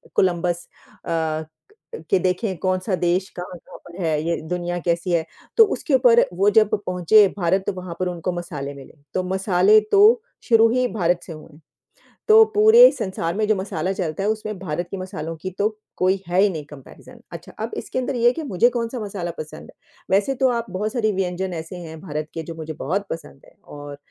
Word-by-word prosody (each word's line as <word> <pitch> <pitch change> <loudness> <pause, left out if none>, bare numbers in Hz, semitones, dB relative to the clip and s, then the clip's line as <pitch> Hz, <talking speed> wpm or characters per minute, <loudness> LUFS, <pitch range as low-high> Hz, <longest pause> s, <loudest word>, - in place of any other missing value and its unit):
Columbus 175 -1 0 0.4
अ, 160 -2 -1 0.7
कि 190 - +4
देखें 185 +1 -1
कौन-सा 185 +2 -1
देश 180 +2 0
कहाँ-कहाँ 180 -1 -9
पर 175 +2 -10
है, 155 -2 0
ये 170 0 0
दुनिया 175 0 -2
कैसी 170 +2 -1
है, 165 -2 +1 0.3
तो 450 - +10
उसके 310 -7 -3
ऊपर 240 -2 +5
वो 195 +3 +3
जब 215 0 +4 0.2
पहुँचे 185 +3 +5
भारत 190 +1 +1
तो - - 0
वहाँ 180 -2 -7
पर 185 - 0
उनको 180 0 -3
मसाले 150 -5 -5
मिले, 135 -1 -13 0.2
तो 185 - 0
मसाले 190 +2 +4
तो 435 +4 +6 0.2
शुरू 225 -1 +5
ही 250 +1 +1
भारत 175 -4 +1
से 165 - -8
हुए 155 +1 -12
हैं। 150 - -18 0.7
तो 440 +1 +8
पूरे 445 +4 +8
संसार 170 -3 -3
में 215 0 +1
जो 215 - +3
मसाला 190 -2 -3
चलता 185 -1 -3
है, 210 - +1
उसमें 215 -2 -3
भारत 175 -1 -4
की 195 - -4
मसालों 175 -4 -6
की 185 - -4
तो 210 +2 +3 0.3
कोई 185 +1 +1
है 180 +1 +1
ही 205 - +4
नहीं 155 -5 -6
कम्पैरिज़न। 145 -3 -14
अच्छा, - - -9
अब - - -3
इसके 255 - -4
अंदर 255 0 -2
ये 235 - 0
है 245 - +5
कि 325 - -5
मुझे 235 -1 +2
कौन-सा 235 0 -3
मसाला 195 -5 -4
पसंद 155 0 -9
है? - - -31 0.4
वैसे 205 +8 +2
तो 260 +1 +2
आप 235 -1 -2
बहुत 210 +6 -3
सारी 220 -3 +1
व्यंजन 185 0 -2
ऐसे 165 +2 -6
हैं 160 0 -9
भारत 155 -3 -4
के 165 - -5
जो 165 +1 -8
मुझे 160 -1 -6
बहुत 195 +7 -2
पसंद 160 -4 -8
है - - -20
और 145 -1 -9
185 Hz, 205 wpm, -22 LUFS, 170-215 Hz, 0.7 s, तो